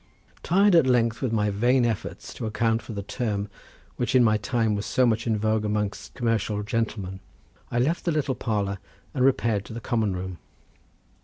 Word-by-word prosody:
Tired 195 +3 +4
at 165 -6 +6
length 115 -3 +2
with 130 - 0
my 105 -2 +1
vain 120 +5 +3
efforts 115 -4 -4
to 115 - -4
account 115 +1 +1
for 115 - -9
the 100 -1 -4
term 105 -2 -2 0.5
which 125 - 0
in 125 - +7
my 110 -2 +4
time 110 0 0
was 105 +1 -3
so 130 - +3
much 115 0 +1
in 110 -2 +2
vogue 110 0 +1
amongst 105 -1 -2
commercial 110 -3 0
gentlemen 105 -4 -2 0.5
I - - -2
left 145 +8 +1
the 170 - +2
little 150 -4 0
parlour, 100 -5 -2 0.3
and 130 - +1
repaired 115 -6 +2
to - - -9
the 115 - -5
common 110 -4 0
room. 90 -1 -5
115 Hz, 185 wpm, -25 LUFS, 105-125 Hz, 0.5 s, in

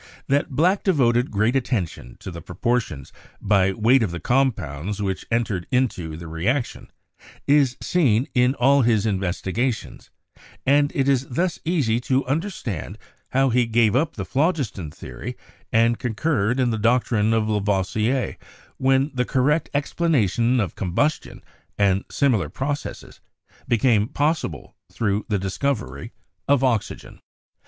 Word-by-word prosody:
That 140 +1 +1
Black 175 +9 +2
devoted 125 -9 +2
great 110 +4 +1
attention 100 - -2
to 95 - -7
the 85 -1 -8
proportions 110 - -2 0.3
by 100 -2 +2
weight 115 +6 +3
of 110 - +1
the 85 0 -5
compounds 105 - -1
which 95 -2 -3
entered 110 -7 -1
into 90 -11 -1
the 85 0 -9
reaction 110 - -2 0.6
is 140 -4 +3
seen 135 - +2
in 125 +1 +3
all 140 +2 +4
his 115 -4 +2
investigations; 100 +4 -2 0.6
and 145 +1 +3
it 135 -1 +1
is 135 -1 +2
thus 170 +7 -1
easy 140 -10 +1
to 130 +2 0
un 140 +5 0
derstand 125 - -5 0.4
how 135 0 +3
he 120 0 +2
gave 115 -1 +3
up 150 +4 +1
the 100 - -4
phlogiston 130 - -1
theory 75 - -8 0.3
and 115 +1 +3
con 120 -4 -3
curred 125 -3 +1
in 125 -2 +2
the 110 - -2
doctrine 115 -1 +2
of 110 -1 +1
Lavoisier 105 +4 0 0.4
when 135 +2 +2
the 125 -1 0
correct 145 +5 +1
ex 145 0 -2
planation 125 - +2
of 100 -7 -1
combustion 120 - -2 0.3
and 100 -1 +2
similar 115 - +1
processes 140 - -5 0.5
became 115 -2 +3
possible 145 - -2 0.2
through 105 -2 -1
the 105 - +1
discovery 95 - -3 0.4
of 140 -1 +3
oxygen. 120 -5 -2
120 Hz, 140 wpm, -23 LUFS, 100-135 Hz, 0.6 s, all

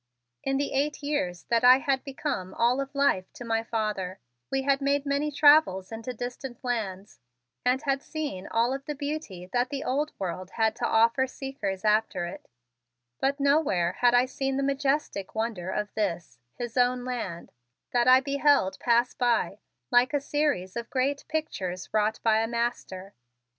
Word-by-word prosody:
In 270 0 0
the 285 +1 -2
eight 290 +2 -1
years 185 - -2
that 235 0 +2
I 250 +1 +9
had 270 -1 0
become 265 -9 -4
all 245 +3 +2
of 275 +1 -7
life 280 -10 +1
to 245 - -9
my 225 -1 +1
father 210 -5 -3 0.3
we 270 0 0
had 275 0 +2
made 280 +1 +1
many 285 +2 0
travels 290 -11 +5
into 225 +2 -5
distant 245 +1 -7
lands 205 -6 -3 0.4
and 255 +3 +1
had 275 -2 0
seen 285 -14 -5
all 235 +3 +1
of 275 0 -5
beauty 285 - -5
that 245 +1 +1
the 280 -1 -4
Old 290 +4 -1
World 185 -1 -4
had 220 -1 +2
to - - 0
offer 230 +4 +3
seekers 220 -8 -5
after 210 -4 +2
it, 175 - -9 0.7
but 280 +1 0
nowhere 280 - +2
had 245 0 +5
I 245 +1 +5
seen 270 +1 -2
the 275 - 0
majestic 275 -7 -1
wonder 220 -5 -2
of 210 +1 -3
this, 175 - -3 0.2
his 240 0 -6
own 250 0 +2
land, 225 -9 -5 0.4
that 240 0 +2
I 255 +1 +8
beheld 280 -7 +2
pass 240 +1 +2
by 235 -4 0 0.3
like 245 +3 +4
a - - +3
series 280 -10 -1
of 235 0 -5
great 275 +2 -1
pictures 190 - -3
wrought 215 0 +1
by 220 -1 +4
a 225 - 0
master. 235 -5 -3
245 Hz, 170 wpm, -27 LUFS, 210-275 Hz, 0.7 s, I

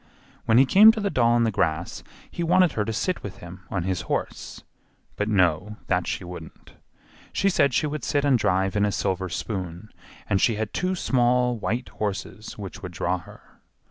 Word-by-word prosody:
When 115 - +4
he 135 - +7
came 210 +10 +8
to 220 - -4
the 200 -1 -1
doll 120 -1 +3
in 120 - +3
the 115 - +1
grass 85 -3 -1 0.3
he - - -5
wanted 180 +1 +4
her 105 - -1
to 115 - -2
sit 180 - -1
with 100 - -8
him 90 +1 -11
on 90 -3 -2
his 90 -1 -1
horse; - - -4 0.5
but 105 +1 -2
no, 95 +1 +1
that - - 0
she - - -3
wouldn't; 90 -3 -11 0.6
she 195 - +1
said 140 -7 +3
she 140 - +1
would 150 0 -4
sit 145 -1 0
and 135 -4 +4
drive 95 +1 +1
in 105 - +2
a 105 - +2
silver 95 -1 -1
spoon, 95 0 -5 0.4
and 95 -1 +1
she 115 - +3
had 110 0 -4
two 185 +1 -1
small 125 -5 +2
while 115 +2 -2 0.2
horses 105 +1 -4
which 100 -3 -8
would 90 - -7
draw 90 +2 -1
her. 85 - -17
105 Hz, 200 wpm, -25 LUFS, 95-130 Hz, 0.6 s, came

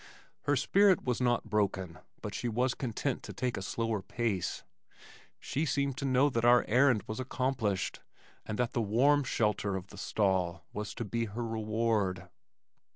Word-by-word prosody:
Her 145 - +3
spirit 190 +7 +4
was 125 -1 -1
not 120 -2 +1
broken, 95 -5 -1 0.2
but 105 - -4
she 120 - -2
was 125 +3 +1
content 120 -5 -2
to - - -8
take 125 -1 -2
a - - -4
slower 115 +1 -2
pace. 110 -3 -2 0.8
She 145 - -2
seemed 140 -3 0
to 140 - -3
know 130 +1 +4
that 115 -2 0
our 120 -1 +6
errand 125 -1 +4
was 110 +3 -5
accomplished 125 -6 -1 0.4
and 110 - -4
that 125 -1 0
the 120 - +1
warm 135 +7 +3
shelter 105 -5 0
of 95 0 -6
the 100 - -11
stall 90 -6 0
was 105 +1 -5
to 115 - -4
be 115 +3 -1
her 115 +3 -4
reward. 110 -5 -1
115 Hz, 165 wpm, -31 LUFS, 105-125 Hz, 0.8 s, our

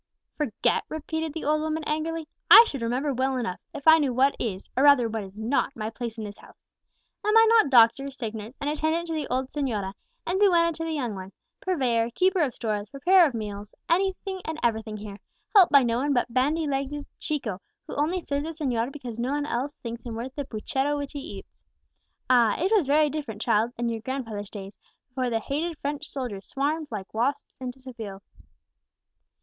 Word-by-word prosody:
"Forget!" 280 -9 0
repeated 320 +1 -3
the 320 +2 -6
old 305 +1 +2
woman 315 0 -2
angrily; 315 +1 -2 0.2
"I 465 - +11
should 275 - -5
remember 255 +5 0
well 260 +1 0
enough, 230 -7 -3
if 285 - -8
I 320 0 +9
knew 285 -4 +1
what 270 +2 +3
is, 195 -5 -3
or 260 - +2
rather 280 -5 +6
what 220 -1 -3
is 195 +1 -12
not, 250 +5 0
my 215 0 -4
place 235 -1 -6
in 220 - -5
this 205 -1 -8
house. - - -19 0.5
Am 425 +1 +4
I 450 - +8
not 450 -9 +5
doctor, 250 +2 +5
sick 240 -5 -5
nurse, 220 +3 -8
and 285 - -3
attendant 315 +3 0
to - - -1
the 305 -3 -2
old 255 +1 -1
señora, 220 -10 -2 0.3
and 370 +2 0
duenna 340 -4 +4
to 325 - -5
the 325 - -2
young 250 -7 -2
one; 190 0 -8 0.3
purveyor, 245 -10 +1
keeper 375 +1 +3
of 275 -6 0
stores, 210 -2 -3
preparer 350 +7 +5
of 265 - -5
meals, 205 -1 -6
anything 380 +2 0
and 320 0 -4
everything 220 -2 0
here, 205 -1 -8 0.4
helped 380 -4 +8
by 280 -2 +7
no 235 -1 +1
one 285 +2 +1
but 245 -2 0
bandy 295 +6 +2
legged 285 +1 -2
Chico, 225 -11 -3 0.2
who - - -7
only 325 +6 0
serves 285 -2 -2
the 310 - -3
señor 240 0 0
because 245 -5 -7
no 245 +2 -1
one 290 0 -1
else 280 +1 -3
thinks 235 -1 -7
him 235 -2 -6
worth 245 +3 -5
the 285 0 -4
puchero 270 +5 -1
which 285 -1 -4
he 290 - -4
eats? - - -10 0.7
Ah! 240 -4 +4
it 370 +4 +1
was 365 -10 +3
very 300 +1 +4
different, 280 -9 -5
child, 225 0 +2
in 235 0 -1
your 230 -1 -2
grandfather's 225 -5 -4
days, 200 -1 -9 0.3
before 255 0 -2
the 225 -1 0
hated 305 +7 -3
French 290 0 -4
soldiers 240 -8 -5
swarmed 300 +3 -1
like 200 -4 -6
wasps 240 +6 -1
into 255 0 -6
Seville!" 225 -7 -8
265 Hz, 205 wpm, -26 LUFS, 230-305 Hz, 0.7 s, I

